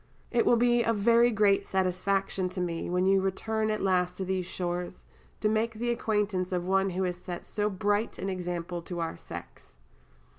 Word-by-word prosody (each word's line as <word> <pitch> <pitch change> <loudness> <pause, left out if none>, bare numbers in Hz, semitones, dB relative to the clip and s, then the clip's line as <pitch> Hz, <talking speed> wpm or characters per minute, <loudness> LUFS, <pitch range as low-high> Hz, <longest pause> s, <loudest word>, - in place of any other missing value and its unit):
It 235 - +2
will - - +6
be 240 0 +3
a 230 0 +2
very 235 +3 +4
great 205 -3 +3
satisfaction 190 0 0
to 185 - -6
me, 170 -2 -2
when 180 +1 +1
you 195 0 +4
return 215 +3 -1
at 215 -2 -1
last 180 -2 +1
to 190 - -3
these 185 -1 -1
shores, 175 0 -4 0.4
to 215 - +2
make 220 +1 +1
the 240 +2 -1
acquaintance 210 -5 0
of 180 -1 -1
one 195 +1 +2
who 185 +1 -1
has 180 -1 -1
set 180 -1 -7
so 210 0 -1
bright 205 +2 0
an 190 - -4
example 175 -2 -3
to 175 +1 -6
our 165 -1 -2
sex. - - -10
190 Hz, 190 wpm, -29 LUFS, 180-215 Hz, 0.4 s, will